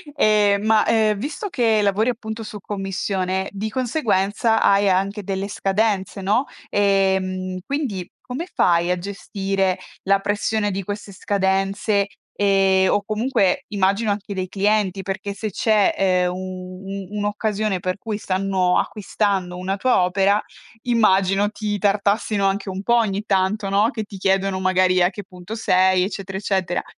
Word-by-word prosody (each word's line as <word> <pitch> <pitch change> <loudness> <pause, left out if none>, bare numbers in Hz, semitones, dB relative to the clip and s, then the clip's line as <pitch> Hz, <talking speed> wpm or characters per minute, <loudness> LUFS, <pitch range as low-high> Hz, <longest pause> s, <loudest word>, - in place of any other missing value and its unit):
Ehm, 210 -4 +3
ma, 220 -1 +4
ehm, 215 -2 +2
visto 300 - -4
che 230 -9 +2
lavori 205 +4 +2
appunto 220 -1 -5
su 210 -1 -8
commissione, 190 -1 -2
di 205 +2 -4
conseguenza 225 -4 +1
hai 200 0 +4
anche 195 +2 0
delle 195 +1 -3
scadenze, 195 -1 -1
no, 215 +8 +1 0.2
ehm, 190 -2 +1
quindi 250 - -3
come 260 +8 -5
fai 170 0 +3
a 180 - 0
gestire 195 -1 -2 0.2
la 195 0 +3
pressione 205 +1 -1
di 195 0 -3
queste 205 +1 -6
scadenze 195 +1 0 0.3
e 195 -1 +3
o 205 - +1
comunque 215 -3 +1
immagino 200 +1 +1
anche 200 0 -4
dei 185 0 -2
clienti, 200 0 0
perché 195 +1 -4
se 215 +2 -4
c'è, 210 +1 +2
ehm, 180 -2 +2
u 185 0 -7
u 195 -1 -6
un'occasione 205 -1 -1
per 185 +1 -2
cui 215 0 -4
stanno 185 -2 +1
acquistando 195 -3 -1
una 190 +2 -2
tua 205 -2 +2
opera, 195 +3 +2 0.4
immagino 200 -4 +3
ti 210 -1 -3
tartassino 205 0 +1
anche 195 +1 0
un 190 +1 -5
po' 235 +3 +3
ogni 210 -3 0
tanto, 195 +1 0
no, 205 +3 +3
che 220 -2 -4
ti 205 -1 -10
chiedono 195 0 +1
magari 185 -1 +3
a 175 - +4
che 205 +1 -8
punto 180 +3 -9
sei, 185 -4 +3
eccetera, 195 0 -4
eccetera. 190 -3 -1
195 Hz, 150 wpm, -21 LUFS, 190-210 Hz, 0.4 s, ma